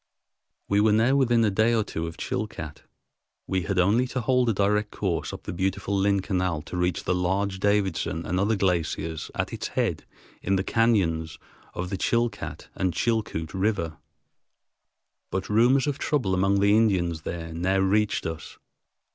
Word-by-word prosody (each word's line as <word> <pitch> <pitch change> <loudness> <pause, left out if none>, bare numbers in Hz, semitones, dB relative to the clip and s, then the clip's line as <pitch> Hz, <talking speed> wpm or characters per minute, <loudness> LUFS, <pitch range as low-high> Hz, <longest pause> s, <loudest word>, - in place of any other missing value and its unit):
We 100 +1 +3
were 105 0 +4
now 115 +5 +3
within 120 -4 +3
a 105 - +2
day 110 +4 +3
or 110 - +2
two 85 -5 -4
of 80 - -8
Chilcat. 105 - -4 0.6
We 95 -1 -1
had 95 +3 -2
only 105 +8 +3
to 130 0 -3
hold 125 +1 +2
a - - +2
direct 105 +1 +1
course 95 -6 -2
up - - -8
the - - -5
beautiful 95 +2 -1
Lynn 100 0 +2
Canal 90 -5 -1
to 85 - -8
reach 90 -1 0
the - - 0
large 95 +2 0
Davidson 95 -5 0
and 90 +3 -1
other 105 +3 +2
glaciers 85 -4 -1
at - - -2
its - - -3
head - - -2 0.3
in 95 - +1
the 95 - 0
cañons 95 -9 +1 0.4
of 90 +1 -4
the 95 - -1
Chilcat 115 +2 -1
and 90 -3 -1
Chilcoot 105 -9 -1
Rivers. 95 -4 0 1.4
But 95 0 -3
rumors 120 +6 +4
of 145 -2 -2
trouble 125 -11 0
among 95 +2 +2
the 100 +1 +5
Indians 90 -7 +2
there 80 0 -5
now 90 +4 0
reached 100 +2 +1
us. 80 -1 -6
95 Hz, 170 wpm, -26 LUFS, 90-110 Hz, 1.4 s, the